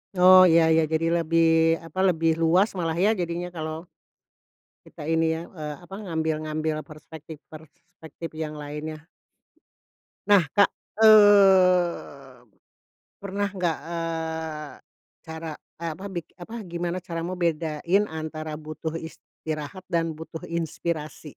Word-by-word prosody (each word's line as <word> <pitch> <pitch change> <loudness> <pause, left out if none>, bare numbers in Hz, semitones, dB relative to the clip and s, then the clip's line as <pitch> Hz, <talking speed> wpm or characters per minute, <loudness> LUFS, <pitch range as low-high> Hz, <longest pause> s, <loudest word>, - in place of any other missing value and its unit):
Oh 185 +1 +8
iya 165 -1 +5
iya 160 0 +4
jadi 160 +1 +1
lebih 165 0 +2 0.4
apa 165 +3 -7
lebih 165 -1 +2
luas 180 +6 +4
malah 165 -1 -1
ya 195 +5 +3
jadinya 175 -3 -3
kalau, 160 -1 -5 1.0
kita - - -12
ini 165 0 +2
ya, 160 - -5 0.2
eee, 150 -1 -5
apa 190 - -11
ngambil 160 -3 -1
ngambil 155 0 -2
perspektif 155 0 -11 0.2
perspektif 160 +1 -11
yang 155 -1 -5
lainnya. 155 +2 -7 1.2
Nah 205 -4 +6
Kak, 200 -1 +5 0.3
eee, 185 - +5 0.8
pernah 200 +1 -2
gak, 175 -5 -1
eee, 160 -2 -4 0.5
cara 160 0 -7 0.2
eh, 165 -1 -4
apa 190 +6 -8
bik 175 -4 -7
apa 225 +7 -9
gimana 175 0 -3
caramu 170 0 -4
bedain 170 +3 0
antara 155 -1 -6
butuh 155 +1 -6
istirahat 160 +1 -7
dan 165 -2 0
butuh 160 0 -8
inspirasi? 160 -2 -4
165 Hz, 120 wpm, -25 LUFS, 155-180 Hz, 1.2 s, Oh